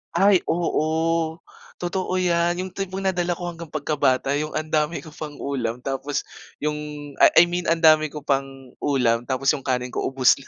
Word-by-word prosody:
Ay, 195 Hz, -1 st, +5 dB
oo. 160 Hz, 0 st, 0 dB, 0.4 s
Totoo 185 Hz, +1 st, -2 dB
'yan. 175 Hz, -1 st, +1 dB
Yung 185 Hz, -, -7 dB
tipong 195 Hz, 0 st, -4 dB
nadala 175 Hz, -2 st, 0 dB
ko 175 Hz, -1 st, -4 dB
hanggang 170 Hz, -1 st, -10 dB
pagkabata, 140 Hz, -3 st, +1 dB
yung 155 Hz, 0 st, -4 dB
ang 155 Hz, 0 st, -3 dB
dami 155 Hz, +2 st, 0 dB
ko 160 Hz, -, -11 dB
pang 150 Hz, -1 st, -7 dB
ulam 125 Hz, -4 st, -2 dB
tapos 135 Hz, +1 st, -2 dB, 0.4 s
yung, 150 Hz, 0 st, 0 dB, 0.4 s
ah, -, -, +9 dB
I 170 Hz, -, +10 dB
mean 175 Hz, 0 st, -3 dB
ang 165 Hz, 0 st, +1 dB
dami 155 Hz, -1 st, +6 dB
ko 150 Hz, 0 st, -8 dB
pang 135 Hz, -2 st, -2 dB
ulam 120 Hz, -4 st, +1 dB
tapos 135 Hz, +1 st, +2 dB
yung 145 Hz, -, -4 dB
kanin 125 Hz, -1 st, -1 dB
ko -, -, -1 dB
ubos 130 Hz, 0 st, +4 dB
na. -, -, -15 dB
155 Hz, 185 wpm, -23 LUFS, 135-175 Hz, 0.4 s, I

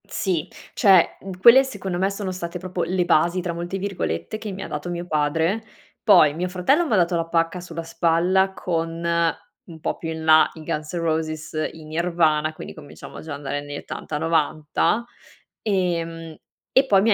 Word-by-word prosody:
Sì, 180 Hz, -4 st, -2 dB, 0.3 s
cioè 190 Hz, -6 st, +5 dB, 0.2 s
quelle 240 Hz, +7 st, +8 dB
secondo 195 Hz, -9 st, -4 dB
me 190 Hz, +1 st, +2 dB
sono 200 Hz, -1 st, -4 dB
state 180 Hz, -1 st, -5 dB
proprio 180 Hz, -1 st, -4 dB
le 180 Hz, +1 st, 0 dB
"basi", 170 Hz, +1 st, +3 dB
tra 175 Hz, -1 st, -3 dB
molte 175 Hz, +3 st, -4 dB
virgolette, 190 Hz, -, -3 dB
che 215 Hz, -2 st, -5 dB
mi 190 Hz, 0 st, -6 dB
ha -, -, -6 dB
dato 150 Hz, +4 st, -5 dB
mio 175 Hz, 0 st, -4 dB
padre. 160 Hz, +6 st, 0 dB, 0.4 s
Poi 170 Hz, -8 st, +6 dB
mio 175 Hz, +4 st, -2 dB
fratello 195 Hz, -, +2 dB
m'ha 225 Hz, -, +2 dB
dato 175 Hz, -2 st, +2 dB
la 165 Hz, -1 st, 0 dB
pacca 165 Hz, +1 st, 0 dB
sulla 170 Hz, -2 st, -7 dB
spalla, 170 Hz, +3 st, +2 dB
con 165 Hz, -3 st, -2 dB, 0.7 s
un 170 Hz, -8 st, -12 dB
po' -, -, -2 dB
più 165 Hz, -, -5 dB
in 160 Hz, 0 st, -5 dB
là 155 Hz, 0 st, +6 dB
i 160 Hz, -, -11 dB
Guns 155 Hz, -1 st, -4 dB
N' 175 Hz, -, -1 dB
Roses, 155 Hz, -1 st, -2 dB
i 160 Hz, -, -12 dB
Nirvana, 160 Hz, -1 st, +1 dB
quindi -, -, -9 dB
cominciamo 145 Hz, -3 st, -11 dB
già 155 Hz, -2 st, -7 dB
a -, -, -3 dB
andare 145 Hz, 0 st, -4 dB
negli 145 Hz, 0 st, -7 dB
80, -, -, -6 dB
90, 160 Hz, +7 st, 0 dB, 0.6 s
ehm, 165 Hz, -5 st, -2 dB, 0.4 s
e 265 Hz, +1 st, +6 dB
poi 195 Hz, -6 st, +4 dB
mi 220 Hz, -, +3 dB
ha -, -, +7 dB
170 Hz, 185 wpm, -23 LUFS, 160-185 Hz, 0.7 s, quelle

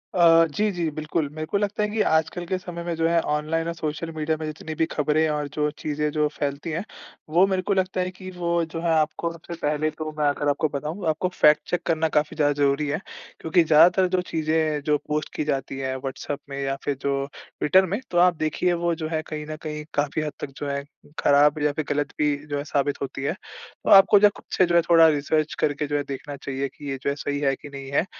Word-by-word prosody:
अ, 165 Hz, -2 st, +6 dB
जी, 210 Hz, +7 st, 0 dB
जी। 175 Hz, -3 st, -1 dB
बिल्कुल। 155 Hz, 0 st, -2 dB
मेरे 155 Hz, +2 st, -5 dB
को 200 Hz, -, -1 dB
लगता 205 Hz, +1 st, -1 dB
है 210 Hz, -, 0 dB
कि 215 Hz, +1 st, 0 dB
आजकल 160 Hz, 0 st, +1 dB
के 185 Hz, +2 st, -1 dB
समय 175 Hz, -2 st, -7 dB
में 170 Hz, 0 st, -2 dB
जो 165 Hz, 0 st, +1 dB
है 170 Hz, 0 st, +3 dB
ऑनलाइन 155 Hz, +2 st, -1 dB
और 170 Hz, -, -2 dB
सोशल 160 Hz, 0 st, -4 dB
मीडिया 155 Hz, 0 st, -1 dB
में 160 Hz, -, -4 dB
जितनी 155 Hz, +1 st, -6 dB
भी 160 Hz, -, +2 dB
ख़बरें 150 Hz, +1 st, +1 dB
और 150 Hz, -1 st, -1 dB
जो 150 Hz, -1 st, 0 dB
चीज़ें 150 Hz, 0 st, -1 dB
जो 150 Hz, 0 st, +1 dB
फ़ैलती 145 Hz, +3 st, -3 dB
हैं 165 Hz, +4 st, -2 dB, 0.5 s
वो 175 Hz, +4 st, +5 dB
मेरे 190 Hz, -1 st, 0 dB
को 200 Hz, +2 st, 0 dB
लगता 185 Hz, -1 st, 0 dB
है 180 Hz, -, -1 dB
कि 185 Hz, 0 st, -10 dB
वो 170 Hz, -1 st, 0 dB
जो 165 Hz, 0 st, -6 dB
है 170 Hz, -1 st, +1 dB
आपको 155 Hz, +2 st, -1 dB
सबसे 170 Hz, +1 st, -9 dB
पहले 150 Hz, +1 st, 0 dB
तो 155 Hz, 0 st, -6 dB
मैं 150 Hz, -, +3 dB
अगर 145 Hz, 0 st, 0 dB
आपको 145 Hz, +2 st, +1 dB
बताऊँ 150 Hz, +7 st, -4 dB
आपको 155 Hz, +4 st, 0 dB
फ़ैक्ट 150 Hz, -3 st, +5 dB
चेक 180 Hz, -, 0 dB
करना 160 Hz, -1 st, +1 dB
काफ़ी 150 Hz, +1 st, 0 dB
ज़्यादा 145 Hz, -2 st, +2 dB
ज़रूरी 140 Hz, +1 st, +2 dB
है। 145 Hz, +3 st, -1 dB, 0.4 s
क्योंकि 165 Hz, +2 st, +3 dB
ज़्यादातर 170 Hz, +4 st, +5 dB
जो 180 Hz, -, +2 dB
चीज़ें 155 Hz, -1 st, 0 dB
जो 150 Hz, -1 st, +3 dB
पोस्ट 150 Hz, 0 st, -2 dB
की -, -, -1 dB
जाती 135 Hz, -2 st, -2 dB
है 130 Hz, -1 st, -2 dB
व्हाट्सऐप 135 Hz, +2 st, -5 dB
में 140 Hz, 0 st, -5 dB
या 135 Hz, 0 st, -1 dB
फ़िर 145 Hz, -, -1 dB
जो 140 Hz, -1 st, 0 dB, 0.3 s
ट्विटर 190 Hz, +5 st, +4 dB
में 195 Hz, +4 st, -2 dB
तो 175 Hz, -, 0 dB
आप 175 Hz, 0 st, +5 dB
देखिए 155 Hz, +3 st, 0 dB
वो 170 Hz, 0 st, 0 dB
जो 160 Hz, -1 st, -4 dB
है 160 Hz, -1 st, -1 dB
कहीं 150 Hz, -1 st, -5 dB
न 155 Hz, -, -4 dB
कहीं 150 Hz, -1 st, -5 dB
काफ़ी 145 Hz, +1 st, 0 dB
हद 150 Hz, -1 st, -3 dB
तक -, -, -5 dB
जो 145 Hz, -, -4 dB
है 140 Hz, 0 st, -2 dB, 0.4 s
ख़राब 145 Hz, +1 st, +4 dB
या 150 Hz, -, +3 dB
फ़िर 150 Hz, +1 st, -3 dB
गलत 145 Hz, -1 st, -1 dB
भी 150 Hz, -1 st, +2 dB
जो 145 Hz, -1 st, -2 dB
है 140 Hz, -, -3 dB
साबित 145 Hz, -1 st, -1 dB
होती 135 Hz, 0 st, -4 dB
है। 145 Hz, -, 0 dB
तो 190 Hz, -, -10 dB
आपको 195 Hz, +1 st, +8 dB
जो 210 Hz, -, +6 dB
है -, -, +2 dB
खुद -, -, -14 dB
से 185 Hz, -, +6 dB
जो 170 Hz, 0 st, 0 dB
है 170 Hz, -, +6 dB
थोड़ा 165 Hz, -1 st, +6 dB
रिसर्च 155 Hz, +1 st, 0 dB
करके 145 Hz, 0 st, 0 dB
जो 145 Hz, -, -2 dB
है 145 Hz, -, -1 dB
देखना 140 Hz, +1 st, -6 dB
चाहिए 135 Hz, 0 st, -3 dB
कि 145 Hz, -, -7 dB
ये 135 Hz, -, -2 dB
जो -, -, +1 dB
है 140 Hz, -, -1 dB
सही 145 Hz, 0 st, -3 dB
है 135 Hz, -2 st, +1 dB
कि 145 Hz, -, -12 dB
नहीं 135 Hz, -1 st, -8 dB
है 140 Hz, -, +2 dB
155 Hz, 250 wpm, -24 LUFS, 145-170 Hz, 0.5 s, आपको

